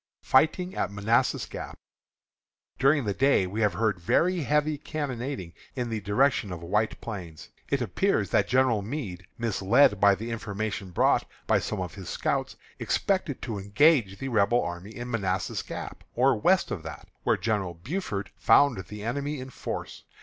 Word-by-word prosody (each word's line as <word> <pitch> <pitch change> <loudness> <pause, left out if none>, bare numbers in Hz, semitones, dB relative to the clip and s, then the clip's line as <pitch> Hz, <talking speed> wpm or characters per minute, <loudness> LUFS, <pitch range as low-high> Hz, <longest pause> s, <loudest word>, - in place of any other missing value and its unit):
FIGHTING 170 +7 +3
AT - - -1
MANASSAS 110 +5 +1
GAP. - - -8 1.0
During 140 -1 +4
the 100 - 0
day 135 -4 +3
we 100 +5 -3
have 105 -2 +3
heard 110 -5 0
very 175 - +2
heavy 150 +1 +1
cannonading 130 - -4 0.2
in 120 -3 -3
the 110 -1 -2
direction 105 +1 +2
of 85 -1 -6
White 105 +5 0
Plains. 90 -8 -7 0.2
It 140 -3 +1
appears 110 - 0
that 100 - +3
General 125 -4 +3
Meade, 100 - -5
misled 115 0 +3
by 100 -1 +6
the 115 +4 -6
information 105 -2 -4
brought 90 - +2 0.2
by - - +3
some - - -3
of 90 -1 -4
his 95 -4 -8
scouts, - - -1 0.2
expected 185 -8 -1
to 110 -5 -3
engage 100 0 +3
the 135 - -4
Rebel 115 +1 +3
army 90 +5 -6
in 120 0 -6
Manassas 95 -5 -1
Gap, - - -7
or 130 +3 +4
west 180 - +2
of 85 - -3
that, 80 0 -9
where - - +2
General 100 -6 -1
Buford 105 - -4
found 135 -10 +4
the 105 0 -8
enemy 140 +5 -2
in 130 +1 -8
force. - - -6
110 Hz, 165 wpm, -27 LUFS, 100-135 Hz, 1.0 s, by